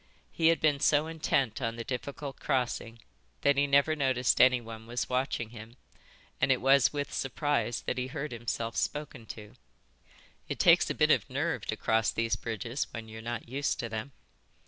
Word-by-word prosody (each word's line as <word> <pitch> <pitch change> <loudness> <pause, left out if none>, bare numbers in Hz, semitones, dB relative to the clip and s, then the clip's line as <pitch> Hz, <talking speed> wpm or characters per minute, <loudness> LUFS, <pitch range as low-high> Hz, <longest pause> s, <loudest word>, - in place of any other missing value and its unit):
He 165 - +2
had 165 0 +4
been 150 -3 +2
so 150 +1 +3
intent 145 -7 0
on 115 0 -1
the 115 - -5
difficult 140 +3 -5
crossing 120 -4 -2 0.4
that 140 0 +4
he 140 +1 +2
never 140 +3 +4
noticed 130 -4 +2
anyone 115 -3 +2
was 120 +1 -3
watching 125 -3 -1
him, 115 +1 -11 0.6
and 130 +1 +4
it 130 - +3
was 135 -5 +5
with 145 -1 -4
surprise 135 -2 -1
that 125 - -2
he 125 - -2
heard 150 +1 -5
himself 115 -1 -3
spoken 145 -6 -3
to. 105 -1 -9 1.0
"It - - -3
takes - - +5
a - - -2
bit - - +4
of - - +2
nerve - - -2
to - - -2
cross 110 -1 +2
these 115 -1 0
bridges 115 +4 -3
when 115 -1 -8
you're 110 0 -8
not 120 0 -5
used 140 +4 -1
to 115 - -4
them." 110 +5 -5
125 Hz, 180 wpm, -30 LUFS, 115-140 Hz, 1.0 s, was